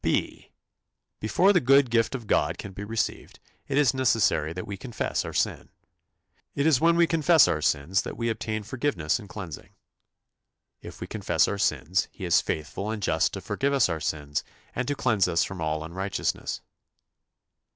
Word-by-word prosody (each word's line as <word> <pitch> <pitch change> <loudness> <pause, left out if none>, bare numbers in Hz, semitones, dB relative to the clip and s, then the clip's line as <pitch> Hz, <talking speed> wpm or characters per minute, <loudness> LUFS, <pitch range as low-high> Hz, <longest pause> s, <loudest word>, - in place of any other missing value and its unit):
" - - -46
(b) - - -1 0.7
Before 185 - +3
the 180 - +5
good 135 -2 +4
gift 115 +1 +2
of 120 -4 -6
God - - +1
can 100 - -7
be 100 - -7
received, 110 +2 -3 0.3
it 140 - -1
is 145 -4 +4
necessary 115 - +2
that 90 +2 -6
we 100 - -5
confess 120 +3 -3
our - - -6
sin. - - -1 0.9
It 140 - 0
is 155 -6 +4
when 170 +1 +4
we 170 0 +5
confess 165 -1 +5
our 75 - 0
sins 75 +6 +1
that - - -7
we 115 - -1
obtain 110 -1 -2
forgiveness 115 - -1
and 105 -4 -12
cleansing. 90 -5 -8 1.1
"If - - -11
we - - -3
confess 90 -7 +1
our 100 - -3
sins, 95 -2 +1
he 95 - -7
is 85 - +4
faithful 80 +7 -4
and 110 -2 -4
just 80 -3 +1
to - - -5
forgive 140 +1 -1
us 135 -8 +3
our 80 -1 -2
sins, 75 -2 -2 0.3
and 125 0 -2
to 145 - 0
cleanse 110 -6 +2
us 85 -2 +2
from 95 -3 -6
all 80 0 -1
unrighteousness." 95 +5 -3
105 Hz, 180 wpm, -26 LUFS, 85-130 Hz, 1.1 s, the